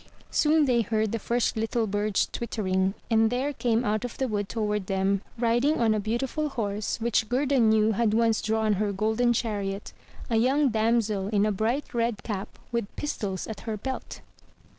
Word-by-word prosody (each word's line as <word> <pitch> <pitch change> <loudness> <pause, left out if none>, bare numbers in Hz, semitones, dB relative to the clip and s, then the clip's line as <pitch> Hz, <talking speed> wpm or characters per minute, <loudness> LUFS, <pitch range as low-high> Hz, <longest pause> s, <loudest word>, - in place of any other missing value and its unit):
Soon 305 0 +4
they 245 -3 +3
heard 220 -1 0
the 230 - -2
first 235 +3 0
little 225 +1 0
birds 205 -1 0
twittering 190 -4 -1 0.2
and 225 0 +4
there 260 +5 -1
came 240 -2 0
out 215 +1 0
of 245 - -5
the 265 - 0
wood 205 -3 -2
toward 210 -3 -1
them, 195 0 +1 0.2
riding 240 +6 +2
on 225 -2 +3
a 215 - 0
beautiful 250 +8 -1
horse 210 -5 -2
which 225 -1 +1
Gerda 270 +2 +2
knew 220 -1 +4
had 220 0 +1
once 225 -1 +2
drawn 220 -1 +1
her 210 -1 +1
golden 220 +4 +1
chariot, 205 -4 -2 0.3
a 230 - +1
young 270 +5 +3
damsel 220 -3 +1
in 205 -1 +2
a 215 - +2
bright 230 +9 -1
red 230 -3 -1
cap 200 -3 -5
with 235 -3 -1
pis 295 - -3
tols 190 -3 -4
at 220 -3 -6
her 220 -2 -4
belt. 265 +5 -6
220 Hz, 185 wpm, -27 LUFS, 210-240 Hz, 0.3 s, Soon